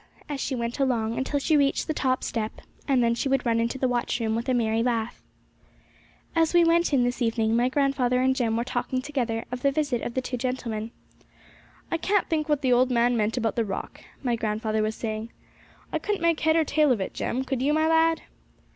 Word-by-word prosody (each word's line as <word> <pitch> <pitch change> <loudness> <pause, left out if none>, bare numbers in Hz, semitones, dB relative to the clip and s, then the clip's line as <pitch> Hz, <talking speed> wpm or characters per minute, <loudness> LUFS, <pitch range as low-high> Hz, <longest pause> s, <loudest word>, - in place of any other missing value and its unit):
as 285 -2 -4
she 265 - -2
went 235 +1 -3
along, 230 -4 +1
until 275 +3 -1
she 310 +3 +2
reached 280 -1 +2
the 315 - -2
top 260 -3 0
step, 220 -2 -3 0.3
and 265 -4 +3
then 235 0 +3
she 270 +4 -2
would 270 -1 +1
run 230 -1 +2
into 230 +3 -1
the 260 - +1
watchroom 240 -2 -1
with 235 +3 -3
a - - +3
merry 225 -1 +1
laugh. 235 -1 -1 1.1
As 330 +1 +2
we 345 - +7
went 335 0 +3
in 265 -4 +3
this 245 +1 -1
evening, 225 -1 +1
my 240 +2 +2
grandfather 260 -2 +1
and 260 +1 +2
Jem 230 -4 0
were 235 - 0
talking 255 0 -2
together 240 -6 -2
of 250 0 -4
the 280 - +3
visit 275 -4 -1
of 235 - -5
the 260 - +1
two 250 0 -3
gentlemen 235 -3 -3 1.0
'I 335 - +1
can't 395 +4 +1
think 310 -1 -1
what 295 -1 +1
the 255 -1 +4
old 250 +1 +4
man 240 0 +2
meant 220 +1 0
about 225 -2 0
the 230 - +1
rock,' 195 -3 -6 0.2
my 245 -3 +1
grandfather 220 0 -1
was 215 0 -1
saying. 220 0 -4 0.6
'I - - +1
couldn't 415 -4 -2
make 335 -2 +2
head 315 +1 +2
or 325 - +4
tail 300 -1 +2
of 240 - +2
it, 190 - -4
Jem; 260 +2 -2
could 265 -1 -2
you, 280 +3 +2
my 315 +1 +2
lad?' 325 0 +3
250 Hz, 225 wpm, -26 LUFS, 230-285 Hz, 1.1 s, we